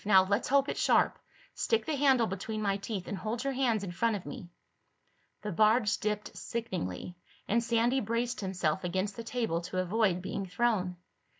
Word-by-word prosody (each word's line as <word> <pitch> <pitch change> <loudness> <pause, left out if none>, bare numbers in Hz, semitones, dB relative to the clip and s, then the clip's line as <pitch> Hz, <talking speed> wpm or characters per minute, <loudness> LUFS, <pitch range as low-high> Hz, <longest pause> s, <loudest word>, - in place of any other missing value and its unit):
Now 195 -2 +6
let's 200 +4 0
hope 275 +1 +4
it's - - -2
sharp. - - +3 0.3
Stick 455 - +1
the 315 - -1
handle 265 -4 +4
between 215 +3 -4
my 200 -1 +1
teeth 195 -2 -5
and - - -3
hold 225 +5 -3
your 275 0 -1
hands 240 -6 +1
in 185 - -4
front 220 +5 +1
of 195 - -6
me." 175 - -8 0.9
The 210 - -3
barge 215 +3 +3
dipped 210 -1 -2
sickeningly 180 - -4 0.3
and 235 +3 +2
Sandy 235 +3 +2
braced 230 +1 -1
himself 185 -3 -1
against 190 +3 -1
the 230 - -6
table 225 -8 -1
to 180 +1 -5
avoid 185 0 +1
being 195 0 -3
thrown. 190 -3 +1
210 Hz, 180 wpm, -31 LUFS, 190-235 Hz, 0.9 s, Now